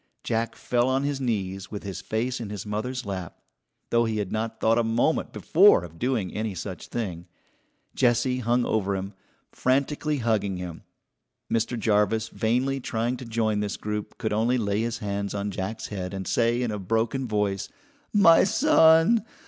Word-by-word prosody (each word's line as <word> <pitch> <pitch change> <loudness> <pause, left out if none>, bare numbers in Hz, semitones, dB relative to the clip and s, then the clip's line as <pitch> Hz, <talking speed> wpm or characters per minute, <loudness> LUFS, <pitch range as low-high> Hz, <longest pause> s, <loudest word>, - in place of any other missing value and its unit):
Jack 115 0 -1
fell 120 +1 0
on 135 +1 +1
his 140 -1 -2
knees 95 -6 -2
with 105 - -6
his 95 -2 -5
face 115 +6 -2
in 115 -4 -5
his 105 -1 -6
mother's 115 +5 -3
lap, 95 -3 -5 0.5
though 115 0 +3
he 110 -1 -1
had 105 -3 -3
not 110 +1 -3
thought 115 +1 +3
a - - +2
moment 115 +8 +1
before 185 - +5
of 85 -1 -11
doing 120 -8 -1
any 110 -2 -3
such 90 +1 -6
thing. 90 -7 -4 0.7
Jessie 125 0 +2
hung 120 0 +1
over 100 -2 0
him, 95 +1 -5 0.4
frantically 140 +3 0
hugging 110 -6 0
him. 90 -2 -7 0.7
Mr. 115 +2 0
Jarvis, 110 +1 +1
vainly 125 +5 0
trying 120 0 -1
to 125 - -8
join 110 -2 0
this 105 -1 -2
group, 105 0 -5
could 110 -3 -2
only 115 +4 +2
lay 105 -2 0
his 120 +1 -2
hands 100 -2 -3
on 100 0 -2
Jack's 100 +4 -4
head 95 -2 -5
and 95 -2 -5
say 120 +1 +2
in 120 - -1
a 105 - -3
broken 115 +6 -1
voice: 105 -2 -1 0.4
"My 190 -6 +6
son! 195 - +5
110 Hz, 175 wpm, -26 LUFS, 100-125 Hz, 0.7 s, My